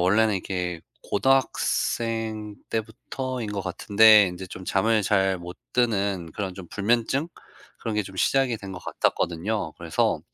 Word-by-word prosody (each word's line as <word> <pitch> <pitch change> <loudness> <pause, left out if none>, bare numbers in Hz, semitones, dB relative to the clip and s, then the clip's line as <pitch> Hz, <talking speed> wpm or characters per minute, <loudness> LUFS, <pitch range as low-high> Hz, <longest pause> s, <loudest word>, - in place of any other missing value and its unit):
원래는 105 +4 +3
이게 90 -3 -3 0.2
고등학생 115 -3 0
때부터인 115 +2 -4
것 100 -2 -3
같은데 105 +3 +6
인제 90 +1 -7
좀 90 +1 -9
잠을 110 +4 +2
잘 95 -2 +2
못 90 +1 -9 0.2
드는 100 -8 0
그런 95 -3 -4
좀 95 -2 -9
불면증? 120 +8 0 0.5
그런 110 -2 -3
게 105 - +1
좀 95 -1 -11
시작이 130 +3 +2
된 100 - -8
것 90 - -6
같았거든요. 95 +6 -1
그래서 - - 0
105 Hz, 285 characters per minute, -25 LUFS, 95-115 Hz, 0.5 s, 같은데